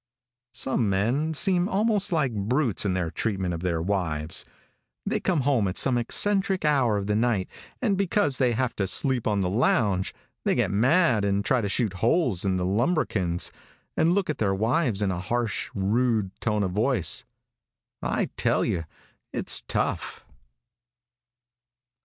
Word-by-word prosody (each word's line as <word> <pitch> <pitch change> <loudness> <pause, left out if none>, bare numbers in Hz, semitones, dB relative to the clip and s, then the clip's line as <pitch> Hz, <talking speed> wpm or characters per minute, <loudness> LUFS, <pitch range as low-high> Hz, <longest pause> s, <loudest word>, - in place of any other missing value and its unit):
Some 120 -5 +1
men 125 +12 0
seem 180 +3 +2
almost 205 0 +1
like 145 -7 +1
brutes 115 +3 0
in 95 -2 0
their 85 -3 -2
treatment 95 -1 -2
of 85 - -4
their 85 -3 -1
wives. 85 -5 -1 0.6
They - - 0
come 175 -6 0
home 125 -6 +2
at 90 - -4
some 130 -2 +3
eccentric 190 - +1
hour 130 -8 +3
of 100 - -3
the 105 +1 0
night, 110 -4 +1 0.4
and 210 -5 +2
because 195 -7 +1
they 125 -3 +3
have 125 +1 -1
to 100 - 0
sleep 125 +5 +1
on 105 -2 +1
the 90 - 0
lounge, 100 -4 +1 0.3
they - - +1
get - - +1
mad 125 - +3
and 100 0 0
try 130 +1 +2
to 100 - -2
shoot 110 -2 -1
holes 115 - +1
in 95 -2 +1
the 90 -1 -1
lambrequins, 100 - 0 0.4
and 165 +2 +3
look 200 0 0
at 155 - -3
their 100 -3 +1
wives 110 - 0
in 95 - +1
a 90 - -3
harsh, 115 +3 -2
rude 110 0 +1
tone 105 -2 0
of 95 - -1
voice. 105 - +1 0.8
I - - -1
tell - - +1
you 85 -2 -2 0.5
it's - - 0
tough. - - -2
110 Hz, 160 wpm, -26 LUFS, 95-140 Hz, 0.8 s, some